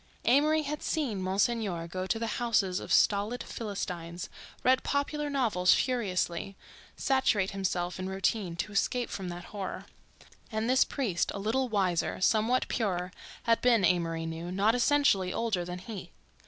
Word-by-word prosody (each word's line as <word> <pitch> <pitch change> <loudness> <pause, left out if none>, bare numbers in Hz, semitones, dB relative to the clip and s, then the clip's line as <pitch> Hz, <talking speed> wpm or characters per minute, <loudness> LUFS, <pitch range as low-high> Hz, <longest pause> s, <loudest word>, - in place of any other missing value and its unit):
Amory 305 +5 +4
had 295 +1 -4
seen 255 - -1
Monsignor 190 -2 0
go 185 +2 -4
to 225 - 0
the 230 - -2 0.2
houses 200 -6 +1
of - - -8
stolid 210 +4 +3
philistines, 180 -5 -5 0.3
read 260 +1 +4
popular 290 +1 -1
novels 225 -10 +3
furiously, 195 -6 -1 0.4
saturate 220 -8 +2
himself 180 -2 -2
in 185 0 -3
routine, 190 -1 -1
to 170 +5 -3
escape 240 +4 0
from 190 -2 -4
that 175 0 -6
horror. 195 -3 -5 0.7
And 220 +1 -1
this 260 +1 +5
priest, 210 - -1
a - - -3
little 235 +6 0
wiser, 190 -5 0
somewhat 220 +6 +2
purer, 185 -6 -1 0.3
had 230 -1 +2
been, 235 -6 +4
Amory 165 -2 +1
knew, 165 +2 -5
not 200 +4 +3
essentially 245 -7 +3
older 220 -5 -1
than 180 +1 -5
he. 195 +2 -8
200 Hz, 150 wpm, -30 LUFS, 180-245 Hz, 0.7 s, this